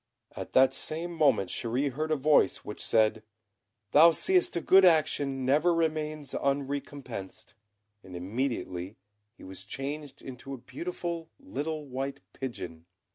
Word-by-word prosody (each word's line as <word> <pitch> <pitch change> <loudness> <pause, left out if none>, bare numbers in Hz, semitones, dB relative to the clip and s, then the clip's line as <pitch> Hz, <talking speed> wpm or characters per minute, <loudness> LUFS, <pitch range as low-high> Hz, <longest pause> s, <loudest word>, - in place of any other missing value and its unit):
At - - -7
the 130 +1 +7
same 170 +3 -2
moment 140 - +2
Chéri 130 +5 -1
heard 155 +5 -3
a 155 - +2
voice 150 +1 +3
which 105 - -6
said, 110 -1 +2 0.7
"Thou 160 +3 +8
seest 365 - +2
a - - +1
good 190 +4 +6
action 145 -6 +3
never 155 +6 +3
remains 155 -3 -2
unrecompensed;" 135 -7 -4 0.5
and 95 -3 -11
immediately 95 -2 -3 0.4
he - - -15
was 95 0 -8
changed 140 +7 -6
into 135 +1 -7
a - - -10
beautiful 170 +4 -5
little 160 - -4
white 135 +1 -4
pigeon. 85 -10 -7
140 Hz, 130 wpm, -29 LUFS, 120-155 Hz, 0.7 s, Thou